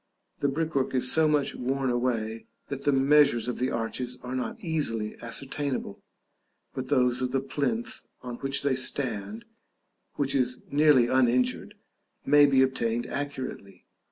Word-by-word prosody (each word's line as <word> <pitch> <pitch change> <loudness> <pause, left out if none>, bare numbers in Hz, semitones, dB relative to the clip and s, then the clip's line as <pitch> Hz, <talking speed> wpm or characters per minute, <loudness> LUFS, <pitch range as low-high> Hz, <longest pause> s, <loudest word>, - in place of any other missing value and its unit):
The 140 - +1
brickwork 140 -2 -1
is 125 0 +4
so 160 -1 +4
much 150 -2 +1
worn 130 +1 -1
away, 115 -2 -2 0.2
that 140 0 -5
the 145 - +4
measures 135 -3 +4
of 125 - -3
the 130 +1 0
arches 125 +2 -3
are 125 0 -5
not 130 -1 -3
easily 115 -10 -2
ascertainable, 130 -2 -3 0.7
but 130 0 -5
those 125 -3 +2
of 125 0 -1
the 135 - +1
plinth 220 - -2 0.2
on 125 -1 -6
which 135 +2 -2
they 140 -1 +2
stand, 130 - -1 0.7
which 140 -2 0
is 125 -2 0
nearly 145 -4 +5
uninjured, 125 0 +1 0.5
may 145 0 +6
be 135 -1 +4
obtained 120 -3 -1
accurately. 130 -9 -6
130 Hz, 145 wpm, -27 LUFS, 125-145 Hz, 0.7 s, may